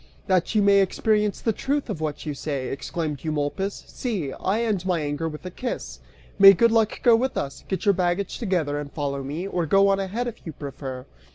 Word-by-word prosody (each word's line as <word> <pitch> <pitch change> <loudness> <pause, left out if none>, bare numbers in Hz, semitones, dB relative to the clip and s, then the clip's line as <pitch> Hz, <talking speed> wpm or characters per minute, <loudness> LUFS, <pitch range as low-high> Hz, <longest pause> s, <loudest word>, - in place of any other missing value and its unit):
"That 185 +3 +1
you 210 - +4
may 200 0 +6
experience 210 +2 +1
the 225 - +1
truth 280 +6 -1
of 195 -9 -4
what 150 -2 -3
you 150 - -2
say," 140 -2 -3
exclaimed 150 +1 -4
Eumolpus, 155 +6 -2
"see! 190 - -3
I 210 +5 -1
end 210 -6 0
my 180 -3 0
anger 145 +2 -2
with 150 +3 -9
a 185 - -5
kiss. 245 +7 -5 0.4
May 195 0 +11
good 230 +5 +4
luck 225 -2 +1
go 235 -2 +7
with 260 +3 -1
us! 140 0 -4
Get 190 - -3
your 200 - +5
baggage 180 +1 -1
together 170 - 0
and 145 -1 -6
follow 140 -2 -3
me, 145 +7 -4
or 175 -4 -1
go 195 +5 +5
on 195 0 +2
ahead, 200 +6 -2
if 235 - -7
you 160 - -7
prefer." 135 -3 -7
185 Hz, 210 wpm, -24 LUFS, 150-210 Hz, 0.4 s, May